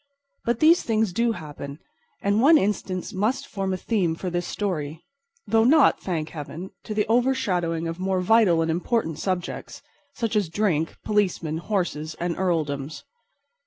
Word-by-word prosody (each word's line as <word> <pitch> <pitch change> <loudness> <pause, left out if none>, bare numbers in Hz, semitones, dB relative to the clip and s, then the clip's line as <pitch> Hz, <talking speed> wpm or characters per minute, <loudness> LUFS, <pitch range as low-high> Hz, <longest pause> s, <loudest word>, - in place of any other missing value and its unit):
But 235 0 0
these 330 +3 +6
things 220 -4 0
do 235 +3 +2
happen; 145 -4 -8 0.5
and 200 +2 +2
one 310 +5 +7
instance 190 -4 -2
must 230 +8 0
form 195 -5 -3
a 185 - -1
theme 185 -5 0
for 180 +2 -4
this 175 0 -2
story—though 205 - -2
not, 285 +4 +5
thank 160 -4 -2
Heaven, 165 +4 -7
to 215 - -4
the 210 - +2
overshadowing 200 -9 +1
of 165 +2 -5
more 190 0 0
vital 180 -4 +4
and 165 - 0
important 175 -1 -1
subjects, 185 -2 -4 0.3
such 230 -2 -2
as 205 -6 +1
drink, 165 -4 0
policemen, 180 -7 0
horses 170 -5 -2
and 175 -1 -1
earldoms. 155 -5 -2
185 Hz, 150 wpm, -25 LUFS, 165-225 Hz, 0.5 s, one